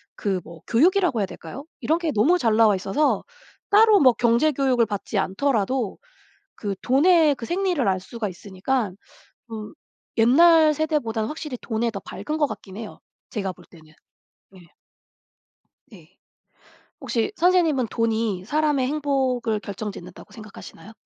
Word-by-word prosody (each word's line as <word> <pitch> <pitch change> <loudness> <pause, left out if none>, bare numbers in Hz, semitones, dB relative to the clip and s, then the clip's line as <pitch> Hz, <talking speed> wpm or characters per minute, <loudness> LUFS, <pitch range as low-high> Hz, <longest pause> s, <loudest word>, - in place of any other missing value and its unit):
그 195 -3 -2
뭐 165 -1 -13
교육이라고 345 - +3
해야 - - +1
될까요? 215 - -10 0.2
이런 320 +2 +1
게 330 -3 -1
너무 285 +12 +3
잘 225 -7 +2
나와 220 -3 +5
있어서 200 +11 0 0.5
따로 425 0 +6
뭐 255 -3 +6
경제 235 +6 +2
교육을 255 -4 +2
받지 205 0 -4
않더라도 225 +2 -1 0.6
그 200 -2 -4
돈의 310 +3 +4
그 235 - -8
생리를 355 - 0
알 185 -1 0
수가 220 +3 -5
있으니까 200 +5 -3 0.6
음 215 +2 -7 0.4
옛날 310 +6 +6
세대보단 275 -8 -1
확실히 300 -1 -6
돈에 230 0 -2
더 200 - -6
밝은 305 +8 -5
것 295 - +3
같긴 195 -8 -9
해요 225 -2 -9 0.3
제가 195 -3 -3
볼 - - -18
때는. 155 -3 -18 0.7
예. 175 -3 -19 1.2
네. 185 -3 -17 0.8
혹시 235 - -2
선생님은 330 -8 +2
돈이 220 -4 -1
사람의 295 0 +1
행복을 265 -6 -1
결정짓는다고 195 -4 -8
생각하시나요? 215 -1 -12
235 Hz, 295 characters per minute, -23 LUFS, 205-300 Hz, 1.2 s, 따로